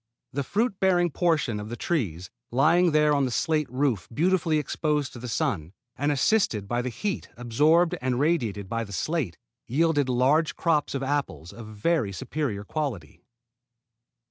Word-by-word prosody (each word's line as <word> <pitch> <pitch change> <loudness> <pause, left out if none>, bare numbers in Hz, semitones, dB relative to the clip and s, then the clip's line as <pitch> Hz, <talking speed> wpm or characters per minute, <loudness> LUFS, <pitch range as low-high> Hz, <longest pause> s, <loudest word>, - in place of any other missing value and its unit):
The 140 - -1
fruit 205 - -1
bearing 175 -3 +3
portion 155 - +1
of 105 +1 -7
the 120 - -4
trees, 95 - -2 0.2
lying 165 +8 +4
there 150 -1 +3
on 140 -2 +2
the - - -1
slate 150 +4 0
roof 125 -6 0
beautifully 165 +3 +2
exposed 150 -1 -1
to 120 - -9
the 125 - -6
sun 100 -5 0
above, 80 +3 -16 0.3
and 145 +2 +1
assisted 135 - +1
by 120 +3 0
the 125 - -3
heat 195 - -4
absorbed 155 +9 +3
and 125 -1 0
radiated 120 - 0
by 115 +3 -2
the 100 -2 -9
slate, 145 - -2 0.3
yielded 145 0 +2
large 135 +6 +2
crops 155 -4 +1
of 135 - -2
apples 135 - -2
of 115 -2 -10
very 110 +2 0
superior 105 0 -3
quality. 135 - -4
140 Hz, 165 wpm, -26 LUFS, 115-160 Hz, 0.3 s, lying